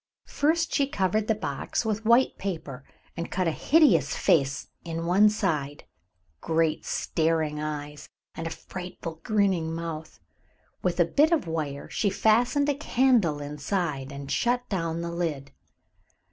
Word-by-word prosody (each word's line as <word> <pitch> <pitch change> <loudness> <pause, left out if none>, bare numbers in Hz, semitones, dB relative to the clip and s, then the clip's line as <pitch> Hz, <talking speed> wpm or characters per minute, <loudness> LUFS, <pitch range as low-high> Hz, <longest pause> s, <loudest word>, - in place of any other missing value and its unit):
First 320 +3 +1
she 280 -2 +2
covered 210 -2 0
the 220 - +2
box 215 - -3
with 220 0 -2
white 240 +3 +4
paper 160 -8 -5 0.3
and 170 0 -4
cut 185 -1 0
a - - +2
hideous 170 - +3
face 140 -2 +1
in 165 -1 -4
one 195 +5 +5
side, 155 -9 -2 0.6
great 160 - 0
staring 160 -2 0
eyes, 150 -1 -5 0.2
and 165 - -5
a - - -2
frightful 175 -2 -7
grinning 190 -6 +1
mouth. 165 -2 -6 0.6
With 180 0 -1
a 175 - +6
bit 300 - +3
of 325 -5 +2
wire 155 -4 -4
she 205 - 0
fastened 240 +8 +2
a 290 - +3
candle 245 - +2
inside 145 -1 -3
and 140 0 -7
shut 245 +1 +1
down 165 -4 -2
the 170 0 -4
lid. 160 -5 -3
170 Hz, 145 wpm, -27 LUFS, 155-215 Hz, 0.6 s, a